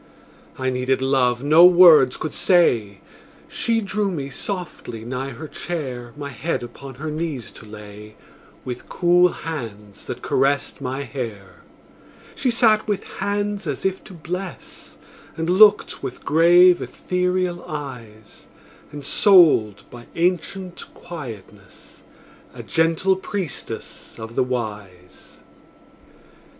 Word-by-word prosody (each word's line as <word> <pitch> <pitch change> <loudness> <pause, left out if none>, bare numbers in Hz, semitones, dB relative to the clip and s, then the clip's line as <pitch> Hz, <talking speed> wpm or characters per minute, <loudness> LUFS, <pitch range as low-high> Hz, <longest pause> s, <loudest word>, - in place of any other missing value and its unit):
I 130 0 -1
needed 130 +1 0
love 130 -2 +1
no 155 +4 +6
words 170 -7 +7
could 155 - -5
say; 115 - +2 0.5
She 230 -1 -1
drew 200 0 -1
me 140 -6 -5
softly 130 - -6
nigh 130 +2 -4
her 140 +5 -8
chair, 130 -9 -5
My 145 -1 -6
head 140 +2 -3
upon 135 +2 -10
her 155 +4 -5
knees 155 -5 -4
to 110 - -13
lay, 105 0 -12 0.5
With 125 -1 -7
cool 175 0 +4
hands 110 - -7
that - - -7
caressed 135 +1 0
my 135 +1 -3
hair. 105 -10 -7 0.8
She 260 - -1
sat 225 -3 +3
with 205 -2 -1
hands 205 -1 -3
as 145 +3 -4
if 190 0 -1
to 190 - -11
bless, 180 +3 -7 0.4
And 165 0 -2
looked 200 +4 +4
with 125 - -7
grave, 175 +3 +5
ethereal 180 -1 -2
eyes; 120 -8 -9 0.4
Ensouled 145 - +4
by 120 -1 -12
ancient 180 +1 -2
quietness, 110 - -11 0.5
A - - -8
gentle 165 +4 +1
priestess 190 -5 -6
of 110 0 -8
the - - +1
Wise. 105 -7 -7
145 Hz, 115 wpm, -22 LUFS, 120-180 Hz, 0.8 s, words